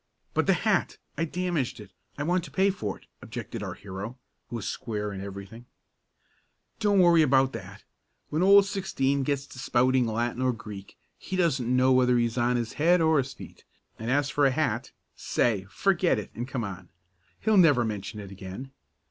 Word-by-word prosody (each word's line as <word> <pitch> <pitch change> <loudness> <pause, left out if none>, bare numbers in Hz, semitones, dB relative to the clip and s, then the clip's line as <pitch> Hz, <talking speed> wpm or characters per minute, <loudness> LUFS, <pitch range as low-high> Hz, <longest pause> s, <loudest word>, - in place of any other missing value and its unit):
"But - - +1
the - - +5
hat - - 0 0.2
I 165 - 0
damaged 170 -7 -2
it 105 -3 -12 0.3
I 145 - -2
want 175 +3 +1
to - - -10
pay 195 +1 +2
for 105 - -4
it," - - -23 0.2
objected - - -6
our - - -5
hero, 105 +5 -7 0.3
who - - -5
was 115 - -4
square 105 -3 -3
in 95 - -6
everything. 100 +4 -9 1.1
"Don't 205 -2 +2
worry 170 -2 +6
about 135 -2 +3
that. - - -9 0.5
When 155 - 0
Old 200 +1 +7
Sixteen 140 -9 0
gets 140 0 -1
to 125 - -12
spouting 125 0 +2
Latin 120 +3 -1
or 130 -1 +2
Greek 105 -3 -10 0.2
he 190 - -5
doesn't 135 -9 +1
know 130 +1 +4
whether 125 -1 +4
he's 120 -1 0
on 125 0 +2
his 120 -2 -2
head 175 +3 +5
or 160 -2 +4
his 135 0 -3
feet, - - -12 0.4
and 115 +1 -4
as 145 +1 +1
for 145 -1 +3
a - - +4
hat - - -1 0.3
say, 105 -6 0
forget 185 - +2
it - - -6
and 120 +2 -5
come 130 -3 -3
on. 95 -3 -7 0.5
He'll 220 -1 +2
never 145 -10 +5
mention 105 -1 -5
it 100 -2 -9
again. 95 +7 -8
130 Hz, 190 wpm, -27 LUFS, 110-160 Hz, 1.1 s, Old